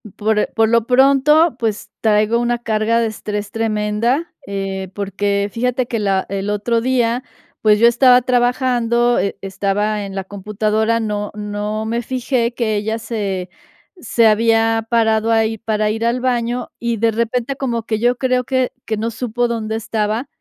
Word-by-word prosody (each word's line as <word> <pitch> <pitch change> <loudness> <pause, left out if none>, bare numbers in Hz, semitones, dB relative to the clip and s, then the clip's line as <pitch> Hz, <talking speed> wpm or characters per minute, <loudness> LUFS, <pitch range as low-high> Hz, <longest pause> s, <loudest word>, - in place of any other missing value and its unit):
por 215 0 +1
eh, - - 0
por 225 -1 +3
lo 230 -1 +2
pronto, 275 +4 +4
pues, 220 -3 -3
traigo 215 +1 +2
una 240 0 0
carga 225 0 0
de 230 - +1
estrés 210 -1 -5
tremenda, 225 +6 -1
eh, 195 -1 -4
porque 200 0 -1
fíjate 250 +1 0
que 230 -2 -3
la 195 -2 0
el 195 +1 -3
otro 225 +3 0
día, 245 -1 +1 0.4
pues, 210 -1 +4
yo 235 +2 +6
estaba 250 +1 +5
trabajando, 245 -1 +2
e 200 - -2
estaba 200 +2 -1
en 195 0 -8
la 195 - -3
computadora, 215 +3 -1
no 210 -2 -3
no 210 +1 -3
me 235 +2 -1
fijé 245 -1 -1
que 220 -3 0
ella 220 +2 -1
se 200 -6 -4 0.5
se 240 -8 +1
había 225 +1 +3
parado 225 -1 +2
ahí 225 -1 +1
para 215 -1 0
ir 225 +1 -2
al 245 +1 0
baño 245 -1 -1
y, 235 -1 -1
de 225 +1 +2
repente, 235 +4 -1
como 240 -4 -2
que 220 -1 -2
yo 245 +2 +2
creo 255 -1 0
que 260 -1 0
que 220 -1 -2
no 230 +2 -2
supo 240 +1 -1
dónde 220 -2 -3
estaba 225 +2 -2
225 Hz, 170 wpm, -18 LUFS, 210-240 Hz, 0.5 s, yo